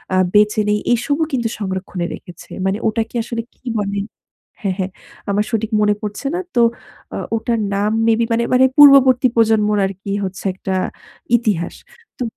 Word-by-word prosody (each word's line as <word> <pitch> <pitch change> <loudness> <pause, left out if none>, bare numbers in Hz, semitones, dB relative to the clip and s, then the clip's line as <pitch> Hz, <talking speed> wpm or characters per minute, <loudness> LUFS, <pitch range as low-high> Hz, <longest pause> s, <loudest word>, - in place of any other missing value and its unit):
আ - - +3 0.2
বেঁচে 210 +1 +4
নেই 210 0 +2
এসবও 285 +6 0
কিন্তু 235 -3 0
সংরক্ষণে 190 -2 -3
রেখেছে। 175 -2 -14 0.2
মানে 190 +2 +1
ওটাকে 225 +2 -2
আসলে 235 0 -4
কী - - -39
বলে? 200 0 -2 0.6
হ্যাঁ, 195 -3 -1
হ্যাঁ 190 0 -2 0.4
আমার 205 +1 +1
সঠিক 225 0 -1
মনে 210 0 +3
পড়ছে 210 +5 -4
না। 360 - -1 0.2
তো 240 - +4 0.5
অ - - -3 0.2
ওটার 230 0 -1 0.2
নাম 205 +2 +1 0.2
মেবি 230 0 +3
মানে, 235 +1 +1
মানে 260 +1 +6
পূর্ববর্তী 270 -3 +7
প্রজন্মর 215 -2 +3
আরকি 195 +1 -6
হচ্ছে 190 +1 -7
একটা 190 0 -4 0.6
ইতিহাস। 205 -7 -2 0.4
তো - - -1
210 Hz, 160 wpm, -18 LUFS, 200-235 Hz, 0.6 s, পূর্ববর্তী